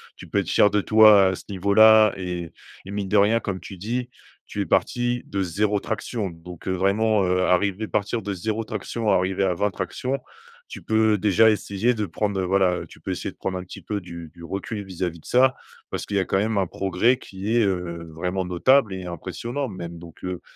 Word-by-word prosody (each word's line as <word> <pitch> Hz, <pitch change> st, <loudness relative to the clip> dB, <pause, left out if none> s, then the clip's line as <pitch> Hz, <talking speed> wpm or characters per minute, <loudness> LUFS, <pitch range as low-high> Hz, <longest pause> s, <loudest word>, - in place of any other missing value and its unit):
tu -, -, -12 dB
peux -, -, -2 dB
être -, -, -3 dB
fier 105 Hz, -, +5 dB
de 105 Hz, -, +1 dB
toi 105 Hz, -2 st, +7 dB
à 95 Hz, -, 0 dB
ce -, -, -11 dB
niveau 100 Hz, +1 st, -1 dB
là 110 Hz, -1 st, +7 dB
et 90 Hz, -3 st, -5 dB, 0.3 s
et 100 Hz, -, -8 dB
mine 100 Hz, -2 st, -3 dB
de 105 Hz, -, +3 dB
rien, 110 Hz, +3 st, +4 dB
comme 95 Hz, -3 st, -4 dB
tu 95 Hz, +3 st, -10 dB
dis, 120 Hz, +6 st, -3 dB, 0.4 s
tu 105 Hz, -, -4 dB
es -, -, -1 dB
parti 120 Hz, +7 st, 0 dB
de 100 Hz, -, -3 dB
0 100 Hz, +3 st, 0 dB
traction 110 Hz, -2 st, -3 dB
donc, 85 Hz, +1 st, -12 dB
heu, -, -, +1 dB
vraiment, 100 Hz, +2 st, +2 dB
heu, 90 Hz, 0 st, +1 dB
arriver 100 Hz, +3 st, +1 dB
partir 105 Hz, +3 st, -1 dB
de 100 Hz, -, -4 dB
0 110 Hz, +4 st, -2 dB
traction 110 Hz, +1 st, -3 dB
arriver 95 Hz, +1 st, +2 dB
à 95 Hz, -2 st, +2 dB
20 105 Hz, +3 st, 0 dB
tractions, 130 Hz, +8 st, -3 dB, 0.5 s
tu -, -, -8 dB
peux 110 Hz, -1 st, +2 dB
déjà 105 Hz, +3 st, +4 dB
essayer 105 Hz, +3 st, 0 dB
de 105 Hz, -2 st, -2 dB
prendre, 100 Hz, +3 st, -2 dB
heu, -, -, 0 dB
voilà, 95 Hz, -1 st, +2 dB
heu, -, -, -8 dB
tu -, -, -16 dB
peux -, -, -5 dB
essayer -, -, -4 dB
de -, -, -25 dB
prendre 95 Hz, -1 st, -3 dB
un 90 Hz, -, -5 dB
petit 90 Hz, -, -11 dB
peu 105 Hz, -1 st, -3 dB
du 85 Hz, -2 st, -9 dB
du 85 Hz, -1 st, -14 dB
recul 100 Hz, +4 st, -5 dB
vis-à-vis 90 Hz, -3 st, -4 dB
de -, -, -22 dB
ça 130 Hz, +1 st, +4 dB, 0.3 s
parce -, -, -4 dB
qu'il 100 Hz, -, -2 dB
y -, -, +4 dB
a 95 Hz, -, 0 dB
quand 95 Hz, -, 0 dB
même 110 Hz, +1 st, 0 dB
un 95 Hz, -3 st, +1 dB
progrès 95 Hz, +9 st, +1 dB
qui 100 Hz, +4 st, -4 dB
est, 120 Hz, -, +4 dB
heu, 85 Hz, -3 st, -2 dB
vraiment 90 Hz, +4 st, -2 dB
notable 105 Hz, +5 st, +3 dB
et 95 Hz, -1 st, -6 dB
impressionnant 120 Hz, -, -4 dB
même 85 Hz, -3 st, -7 dB
donc, 85 Hz, -1 st, -14 dB
heu, 90 Hz, -1 st, -4 dB
100 Hz, 230 wpm, -24 LUFS, 90-110 Hz, 0.5 s, toi